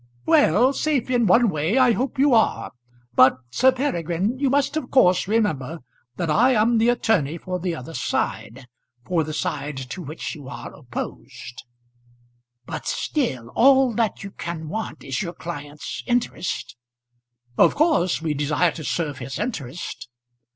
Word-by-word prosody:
"Well; 240 - +4
safe 275 -3 0
in 240 -3 +2
one 230 +6 +5
way 160 - 0
I 255 -2 +5
hope 260 +5 -2
you 275 0 +4
are. 220 - +2 0.4
But, 130 +1 +6
Sir 260 - +4
Peregrine, 205 - -1
you 275 -1 +2
must 285 +2 +1
of 310 -5 -3
course 185 -8 +4
remember 170 - -1 0.3
that 170 - -2
I 205 +12 +4
am 225 +2 +3
the 230 +2 +3
attorney 205 - +1
for 180 +2 -4
the 175 -1 -2
other 155 +2 -9
side, 120 0 -3 0.4
for 170 -3 +1
the 155 - -5
side 150 -2 -3
to 130 +7 -6
which 155 0 -6
you 145 -5 -10
are - - -8
opposed." 125 - -8 1.0
"But - - -6
still; 130 - -2
all 265 - +4
that 220 -2 -1
you 200 - -7
can 160 -4 -6
want 220 +5 -5
is 135 -2 -3
your 175 -2 -4
client's 150 -4 -7
interest." 240 - -2 0.8
"Of - - +4
course 285 - +2
we 155 -2 0
desire 150 +4 +1
to 155 - -8
serve 140 +2 -2
his 130 +2 -6
interest." 170 - -5
180 Hz, 155 wpm, -23 LUFS, 150-245 Hz, 1.0 s, But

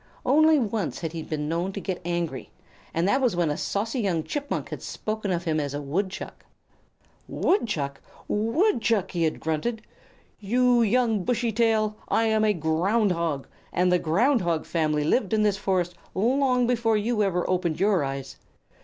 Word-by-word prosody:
Only 310 +4 +5
once 220 - -2
had 165 -2 -3
he 165 - -4
been 150 -1 -4
known 170 +4 -1
to 200 - -4
get 185 -2 -4
angry, 170 -6 -3 0.4
and 165 +3 0
that 265 +7 +2
was 245 -8 +2
when 170 -3 +1
a - - -1
saucy 225 - -2
young 180 -7 0
Chipmunk 285 - -3
had - - -6
spoken 215 -1 -4
of 175 -2 -1
him 160 -3 0
as 145 -1 -3
a - - -2
Woodchuck. 190 +7 -4 0.8
"Woodchuck! 155 - 0 0.3
Woodchuck!" 230 - +1
he 170 -2 0
had 155 - -1
grunted. 160 +9 -2 0.6
"You 245 +3 +3
young 225 -2 +2
Bushy 235 +2 0
tail, 215 -1 +1
I 225 - +2
am 220 -1 +2
a 215 - +4
Ground 180 +6 +1
Hog, 165 -5 -1 0.3
and 180 0 +2
the 180 - +4
Ground 225 - +2
Hog 170 -3 -1
family 155 -3 0
lived 200 - +1
in 215 -1 +3
this 205 -2 +2
forest 185 -3 0 0.2
long 250 +4 +2
before 235 -2 +2
you 215 +1 0
ever 180 -3 0
opened 175 -3 0
your 195 -4 +3
eyes. 135 -1 -5
195 Hz, 170 wpm, -25 LUFS, 165-230 Hz, 0.8 s, Only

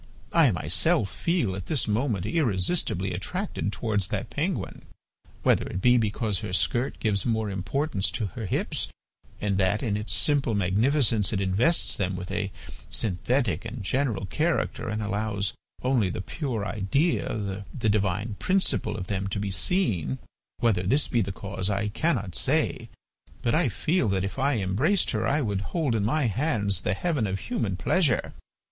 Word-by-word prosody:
I - - +6
myself 100 - +1
feel 165 - 0
at 95 -1 -6
this 145 -7 0
moment 110 -3 0
irresistibly 100 - +1
attracted 180 - -2
towards 105 0 -1
that - - -3
penguin. - - -2 0.6
Whether - - +3
it 90 - -3
be 125 +5 +5
because 105 -2 -1
her 90 - -5
skirt 120 +7 +1
gives 100 -4 +1
more 110 -3 0
importance 100 - -1
to 120 -3 -1
her 110 -4 -4
hips, - - -1 0.5
and 100 -2 0
that 100 +4 +2
in 110 -5 0
its 105 +1 -3
simple 140 -6 +2
magnificence 110 +3 +2
it 100 - 0
invests 100 - +2
them 95 -1 -1
with 90 0 -6
a 100 -2 -2 0.4
synthetic 110 - 0
and 115 -1 -6
general 125 -2 0
character 150 - -1
and 105 0 -2
allows 105 -1 -1 0.3
only 125 -7 +2
the 90 - -4
pure 115 - -3
idea, 105 - 0
the 115 -5 -1
divine 100 +1 0
principle, 185 - +1
of 90 - -4
them 95 0 -2
to 100 - -2
be 100 -1 -2
seen, 90 - 0 0.4
whether 110 -6 +2
this 130 +11 +2
be 120 - +2
the 100 -1 -2
cause 95 0 -3
I 100 +1 0
cannot 105 - 0
say, - - +1 0.5
but 120 - +2
I - - +3
feel 125 - +1
that 95 -1 +1
if 100 +7 -4
I 135 -1 +2
embraced 115 - +2
her - - 0
I 150 +2 +2
would 100 -6 -1
hold 150 - -1
in 110 -3 +1
my 140 +7 +1
hands 110 - 0
the 90 - 0
heaven 145 - 0
of 95 0 -1
human 115 - -2
pleasure. 160 - +1
105 Hz, 165 wpm, -27 LUFS, 95-130 Hz, 0.6 s, I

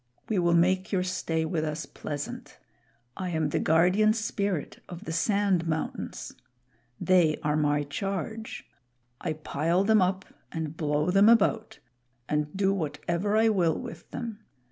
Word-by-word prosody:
We 210 -4 +1
will 170 -1 +3
make 185 +2 +2
your 185 -3 +1
stay 165 -3 -1
with 160 -1 -1
us 155 +1 -3
pleasant. 145 -1 -6 0.6
I 185 -1 -3
am 160 -3 0
the - - 0
Guardian 180 +7 +4
Spirit 200 -6 -2
of 175 +4 -8
the - - -4
Sand 190 0 +1
Mountains. 160 0 -4 0.7
They 175 -4 +3
are 150 0 +1
my 150 -1 +2
charge. 195 +8 -4 0.5
I 160 - -2
pile 160 +4 0
them 215 0 +4
up 185 +1 0 0.3
and 160 -2 -4
blow 150 +1 0
them 200 +3 +6
about 225 -1 +3 0.5
and 150 0 0
do 195 0 +2
whatever 170 +4 -1
I 225 +1 +5
will 175 -6 +2
with 165 +1 -9
them. 230 -4 -6
175 Hz, 145 wpm, -28 LUFS, 155-200 Hz, 0.7 s, them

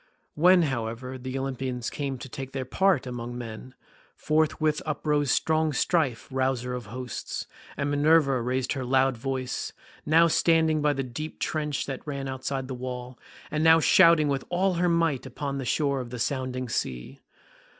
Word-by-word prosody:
When, 175 +3 +5
however, 125 -1 -3
the 130 +1 -4
Olympians 130 -2 -3
came 140 -2 -3
to 130 - -8
take 135 +1 -7
their 135 -1 -3
part 190 0 +2
among 120 -1 -5
men, 120 +1 -8 0.4
forthwith 155 0 +1
uprose 150 -2 0
strong 160 +1 +2
Strife, 145 -6 0
rouser 130 -1 -1
of 125 -4 -5
hosts, 125 +2 -5 0.3
and 140 +1 -1
Minerva 145 -3 +4
raised 125 +1 -1
her 130 -1 -3
loud 130 +1 +2
voice, 130 +1 -3 0.3
now 165 +2 +5
standing 160 -1 +3
by 150 0 +3
the 135 -1 -2
deep 145 +5 -6
trench 150 -2 -2
that 135 -2 -5
ran 140 -2 -4
outside 130 0 -3
the 130 - -5
wall, 125 0 -6 0.3
and 155 0 0
now 160 0 +7
shouting 165 -2 +6
with 140 -1 -1
all 185 +2 +1
her 175 +1 +1
might 165 -6 +1
upon 140 +1 -4
the 135 - -4
shore 140 +1 +1
of 120 - -8
the 125 - -6
sounding 130 +1 -2
sea. 60 - -4
135 Hz, 165 wpm, -27 LUFS, 125-155 Hz, 0.4 s, now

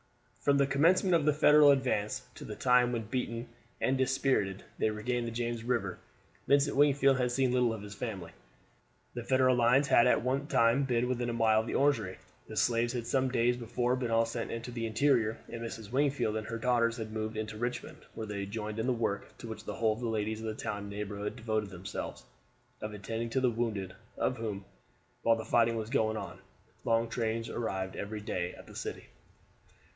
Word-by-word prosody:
From 140 -1 +4
the 140 - +4
commencement 170 +7 +3
of 165 -4 +3
the 150 - +4
Federal 150 0 +7
advance 130 -7 +1
to - - -10
the - - -6
time 125 -1 +4
when, 115 -2 -2
beaten 120 +1 -3 0.3
and 130 - +2
dispirited, 130 -7 +1 0.2
they 110 - +2
regained 120 +3 -2
the - - -3
James 120 0 -3
River, 115 -6 -1 0.5
Vincent 140 +1 +3
Wingfield 140 -1 +4
had 125 -1 +1
seen 130 0 +2
little 125 -2 +3
of 110 -2 -5
his 100 -1 -8
family. 100 -6 -5 0.8
The 120 - -5
Federal 130 0 +3
lines 125 +4 +4
had 120 - +6
at 125 - +3
one 135 +3 0
time 115 +3 +3
been 125 -2 +1
within 125 -1 -1
a - - -2
mile 110 -2 +4
of 110 - -8
the - - -2
Orangery. 115 -10 +2 0.3
The - - -8
slaves 120 0 +2
had 120 -2 -3
some 130 +2 +1
days 120 0 +2
before 120 +1 -1
been 125 -2 -2
all 115 0 +3
sent 115 +1 -4
into 115 +1 -5
the 115 -1 -3
interior, 115 -2 +2
and 115 - -7
Mrs. 115 -2 -7
Wingfield 130 -5 +1
and 110 0 -3
her 115 - -3
daughters 115 0 +2
had 110 -1 -6
moved 110 0 -3
into 110 0 -4
Richmond, 120 +1 -4 0.2
where 110 - -4
they 100 -2 -4
joined 105 +1 -4
in 110 - -1
the 130 - +3
work, 115 -4 -3
to - - -9
which 110 -1 -7
the - - -4
whole 110 -1 +2
of 110 - -8
the 120 - -2
ladies 110 0 -1
of 110 - -4
the 110 - -3
town 105 - -3
and 100 0 -7
neighborhood 105 0 -4
devoted 110 -2 -2
themselves, 95 +1 -6 0.6
of 110 - -4
attending 110 +3 -4
to 130 - +1
the 125 -2 +2
wounded, 110 -5 -2 0.2
of 130 - 0
whom, 105 -4 -4 0.6
while 115 - +4
the 110 - -5
fighting 115 0 +3
was 110 +1 -4
going 110 -5 +1
on, - - -7 0.4
long 115 0 +2
trains 115 -1 -2
arrived 95 -5 -3
every 105 +1 -5
day 90 -3 -3
at - - -13
the - - -14
city. - - -5
115 Hz, 210 wpm, -31 LUFS, 110-125 Hz, 0.8 s, Federal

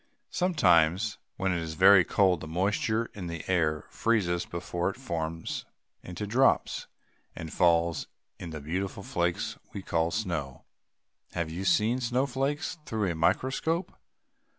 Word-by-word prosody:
"] - - -49
Sometimes, 105 - +3 0.2
when 95 0 0
it 85 - 0
is 80 -1 -5
very 95 +1 +7
cold, 90 -1 +2
the 80 - -6
moisture 105 +6 0
in 95 -4 -6
the 85 -2 -6
air 80 -5 +1
freezes 95 -7 +1
before 85 +1 -2
it 95 - -6
forms 80 -9 -4 0.4
into 90 +4 -6
drops, 125 +6 +2 0.5
and 80 -1 -7
falls 85 -2 +2 0.3
in 85 - -6
the 80 -2 -6
beautiful 95 +6 -3
flakes 95 +6 -1
we 100 - -6
call 80 -2 +1
snow. 85 - -3 0.7
Have 85 -2 -2
you 85 - -5
ever - - -4
seen 115 +4 +2
snowflakes 135 +6 -1
through 110 -9 -1
a - - -4
microscope? 135 - 0
90 Hz, 145 wpm, -28 LUFS, 85-110 Hz, 0.7 s, very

